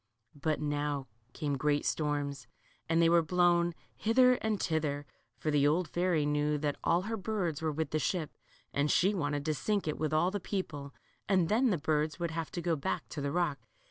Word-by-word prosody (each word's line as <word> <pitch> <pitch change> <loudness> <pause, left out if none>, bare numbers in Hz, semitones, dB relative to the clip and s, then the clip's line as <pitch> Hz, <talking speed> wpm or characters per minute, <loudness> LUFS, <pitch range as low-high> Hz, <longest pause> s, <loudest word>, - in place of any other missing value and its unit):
But 150 +1 -1
now 145 -2 -1 0.3
came 145 -1 -2
great 145 +1 +1
storms, 145 -5 -1 0.4
and 165 0 +3
they 170 - +5
were 170 0 +5
blown 175 0 +2 0.2
hither 250 +3 +4
and 220 -4 -1
thither, 150 -3 -1 0.3
for 155 - -1
the 145 -1 +4
old 165 +4 +2
fairy 175 -4 +1
knew 150 0 +1
that 145 -1 -1
all 170 +2 +2
her 225 +3 -2
birds 190 -7 -2
were 160 -1 0
with 155 -1 -3
the 155 - +1
ship, 165 -1 -2 0.4
and 145 +1 +1
she 190 +7 +3
wanted 145 -5 -1
to 155 - +1
sink 200 +7 -1
it 155 - -2
with 155 -1 0
all 165 +4 +2
the 205 - -2
people, 155 -8 -4 0.4
and 185 -4 +3
then 240 +4 +3
the 190 - +2
birds 155 +1 0
would 170 -1 -1
have 160 -1 -3
to 175 - -3
go 170 -1 +1
back 140 - -3
to 150 - -5
the 140 0 -1
rock. 170 -5 0
155 Hz, 205 wpm, -31 LUFS, 145-175 Hz, 0.4 s, they